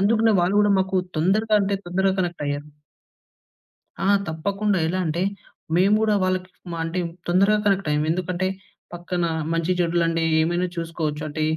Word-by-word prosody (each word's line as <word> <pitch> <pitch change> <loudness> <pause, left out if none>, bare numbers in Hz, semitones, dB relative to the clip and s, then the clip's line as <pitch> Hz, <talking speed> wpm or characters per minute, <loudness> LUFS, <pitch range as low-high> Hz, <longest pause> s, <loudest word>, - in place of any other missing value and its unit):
అందుకనే 220 +2 +3
వాళ్ళు 180 +4 +1
గూడా, 205 -1 +4
మాకు 190 0 -1 0.2
తొందరగా 210 +6 +2
అంటే 200 0 0
తొందరగ 190 +2 +1
కనెక్టయ్యారు. 145 -4 -3 1.4
ఆ! - - +2 0.2
తప్పకుండా. 200 +5 -1
ఎలా 185 +3 -1
అంటే, 165 +3 -1 0.5
మేము 195 +4 +4
గూడా 215 -1 +2
వాళ్ళకి 185 0 -1 0.2
మా 170 - -4
అంటే, 175 +3 -2 0.3
తొందరగా 195 +4 +3
కనెక్టయ్యాం. 160 -7 +1
ఎందుకంటే, 180 +1 -1 0.5
పక్కనా 175 0 -2 0.2
మంచి, 165 +2 0
చెడులండే 165 -1 +1 0.2
ఏమైనా 175 +3 0
చూసుకోవచ్చు. 165 -3 -3
అంటే, 155 +1 -3
180 Hz, 135 wpm, -23 LUFS, 165-195 Hz, 1.4 s, గూడా